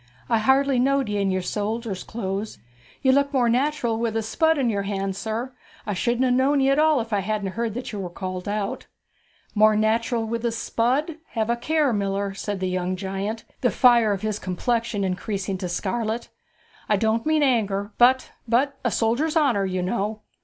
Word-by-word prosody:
I 230 -2 +3
hardly 265 +3 +3
knowed 270 -1 +2
ye 205 -1 0
in 195 - +1
your 185 -1 -1
soldier's 210 +1 -3
clothes. 205 -1 -4 0.5
You'd 265 -1 +5
look 280 +1 +2
more 250 -4 +2
natural 245 -2 +1
with 230 -1 -1
a 225 - -1
spud 320 +8 +2
in 265 -3 +1
your 205 -3 0
hand, 195 -1 -2
sir. 225 +5 -4 0.3
I 210 - -2
shouldn't 240 +7 +1
ha' 250 - +2
known 275 +3 +3
ye 270 0 +3
at 275 - +3
all 310 -2 +4
if 225 0 -6
I 205 - +2
hadn't 200 0 -2
heard 230 +1 -3
that 250 - -5
you 210 - -5
were 185 -2 -4
called 185 +1 -5
out.' 205 -1 -3 0.7
'More 215 0 +5
natural 225 +2 +1
with 230 +1 -3
a 235 - +1
spud! 260 +7 0 0.2
have 225 0 0
a - - +2
care, 295 +2 +1
miller,' 200 -1 -1
said 200 0 -4
the 185 - 0
young 185 0 -1
giant, 195 +4 -4 0.2
the 245 - +3
fire 235 -4 +5
of 200 0 -2
his 215 -1 -1
complexion 225 +3 -1
increasing 190 0 -2
to 180 -2 -3
scarlet. 220 +5 -2 0.6
'I 210 - +4
don't 220 +2 +1
mean 310 -1 +3
anger, 205 -6 +1
but 255 +2 +4 0.2
but 270 +4 +1
a 245 - +2
soldier's 245 +9 +1
honour, 240 -11 +2
you 185 -1 -2
know!' 210 +2 -2
225 Hz, 195 wpm, -24 LUFS, 200-250 Hz, 0.7 s, You'd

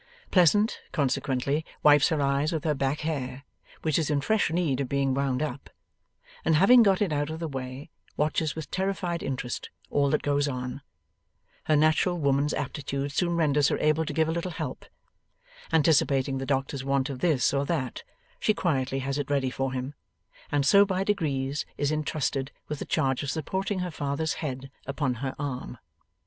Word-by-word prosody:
Pleasant, 205 +5 +4
consequently, 140 +1 0 0.2
wipes 145 -1 +6
her 160 - 0
eyes 140 +2 +1
with 160 -3 -2
her 155 - +2
back 135 +1 -1
hair, 140 -4 -3 0.4
which 155 0 +2
is 160 - -1
in 145 -2 +2
fresh 215 +8 +1
need 160 -5 0
of 130 - -3
being 140 -1 +1
wound 135 0 0
up, 140 -2 -5 0.7
and 160 - +3
having 235 +10 +7
got 200 -2 +4
it 180 -6 -1
out 145 0 0
of 160 +1 -5
the 165 - -3
way, 130 +1 -6 0.3
watches 155 +1 0
with 160 -1 -7
terrified 185 -3 -1
interest 125 -2 -4 0.2
all 140 -1 +2
that 150 - +1
goes 145 0 +1
on. 125 0 -4 0.8
Her 155 - +3
natural 155 +4 +3
woman's 140 -1 +2
aptitude 140 -1 -3
soon 170 +3 0
renders 150 -3 +3
her - - +1
able 155 +1 +2
to - - -2
give 160 -1 +1
a - - 0
little 170 +2 -2
help. 165 - -5 0.9
Anticipating 140 -4 +3
the 135 - -4
doctor's 135 0 -1
want 135 0 0
of 130 - -6
this 150 -7 +2
or 140 0 +1
that, 135 -7 -2 0.4
she 215 - +2
quietly 135 -5 0
has 140 +1 -1
it 145 - -3
ready 135 -3 +1
for 135 0 -2
him, 130 +2 -4 0.6
and 145 -1 +2
so 200 +8 +7
by 190 -1 0
degrees 145 -8 -1
is 145 +1 0
intrusted 150 -3 -1 0.2
with 150 -1 -4
the - - -4
charge 130 -1 +1
of 145 - -3
supporting 190 +6 -2
her 180 -1 -3
father's 145 0 -2
head 135 -3 -5 0.2
upon 140 -2 -1
her 135 -1 -3
arm. 130 -3 -4
145 Hz, 180 wpm, -27 LUFS, 135-160 Hz, 0.9 s, having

